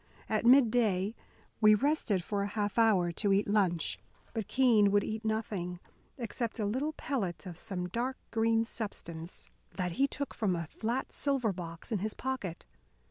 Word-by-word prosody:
At 220 +1 +1
mid 250 -2 +7
day 210 -4 +2 0.5
we 215 -1 +7
rested 235 - +1
for 200 +2 -1
a 200 - 0
half 205 +1 -1
hour 195 -6 +4
to 200 +4 0
eat 195 +1 +3
lunch. 175 - +2 0.3
But 220 -4 -3
Keene 235 -6 +5
would 205 0 +3
eat 220 +1 -4
nothing, 205 -5 -2 0.4
except 235 -1 -3
a 210 - +1
little 265 +9 -1
pellet 205 - -3
of 180 -2 -6
some 180 +1 -4
dark 245 +7 -2
green 225 0 +2
substance 170 -7 -6 0.2
that 180 -2 -1
he 270 +11 +2
took 280 +1 -4
from 195 -5 0
a 170 -1 -3
flat 230 - -3
silver 270 -7 0
box 170 0 -7
in 215 - +1
his 215 +3 -3
pocket. 255 -10 -4
215 Hz, 170 wpm, -31 LUFS, 185-235 Hz, 0.5 s, mid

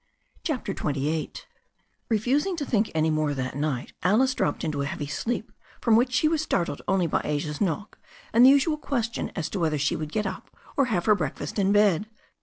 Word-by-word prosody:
CHAPTER 260 -10 -2
XXVIII 150 -1 -2 0.8
REFUSING 260 - +1
to 300 -4 -3
think 220 -4 +1
any 160 0 +2
more 155 -2 0
that 130 -1 -3
night, 140 -4 -2
Alice 235 +9 +3
dropped 145 - -1
into 145 -2 -1
a 140 - -1
heavy 145 - -4
sleep 215 +11 -3 0.3
from 225 - +3
which 245 +3 +3
she 310 - +3
was 315 -1 +1
startled 175 - -1
only 190 -2 +2
by 160 - 0
Asia's 150 0 -2
knock 195 +1 -2 0.3
and 235 +2 +6
the 260 - +10
usual 285 +3 +4
ques 235 -6 -2
tion - - -3
as 165 -4 -2
to 195 - -2
whether 155 -3 +1
she 145 0 +1
would 155 -1 -5
get 210 +2 -1
up 190 -1 -5 0.3
or 275 - +3
have 200 -8 -1
her 215 - +6
breakfast 205 - -3
in 195 0 +3
bed. 205 -2 +3
195 Hz, 205 wpm, -26 LUFS, 155-240 Hz, 0.8 s, the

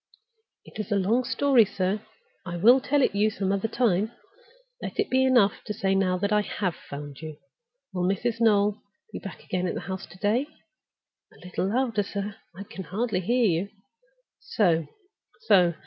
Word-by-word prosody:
"It - - -12
is 215 0 -4
a - - +3
long 210 +6 +2
story, 260 -1 +4
sir; 195 +1 -1 0.4
I 175 -2 -5
will 240 +9 +6
tell 280 +1 +2
it - - +2
you 205 +2 +3
some 195 -3 -2
other 200 +2 0
time. 220 -3 +1 0.7
Let - - -6
it 415 - 0
be 260 0 +4
enough 245 -6 +3
to 210 - -3
say 195 -1 +1
now 190 -1 +2
that 200 +3 -1
I 210 - +4
have 195 -3 -2
found 145 0 -9
you. 155 -2 -7 0.6
Will 180 -1 0
Mrs. 230 +4 -1
Noel 210 -2 +3 0.3
be - - -4
back 195 - -9
again 185 0 -2
at - - -2
the - - -4
house 190 +2 -6
to 175 - -15
day? 220 +8 +1 0.8
A - - -17
little 180 +1 -2
louder, 235 -3 +1
sir; 200 0 -5 0.2
I 195 - -7
can 195 -3 -9
hardly 210 +2 -1
hear 240 +6 +2
you. 180 0 +1 0.7
So! 165 -6 +1 0.5
so! 180 - +4
200 Hz, 180 wpm, -26 LUFS, 185-230 Hz, 0.8 s, will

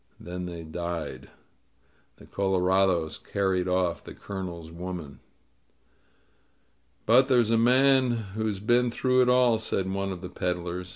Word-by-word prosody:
Then 90 0 -6
they 85 -1 -7
died. 85 -1 -5 0.9
The - - -15
colorados 95 -3 +1
carried 95 -2 -1
off 90 -1 0
the - - -10
Colonel's 90 -5 -7
woman. 85 -4 -7 1.9
^^But 125 +4 +6
there's 120 -4 +3
a - - +4
man 130 +2 +4 0.2
who's 110 -2 -2
been 120 +4 +2
through 130 +2 +2
it 125 - +3
all," 125 -3 +4
said 95 -3 -2
one 100 0 -2
of 90 -2 -7
the 90 - -7
peddlers. 90 0 -4
95 Hz, 130 wpm, -27 LUFS, 90-115 Hz, 1.9 s, ^^But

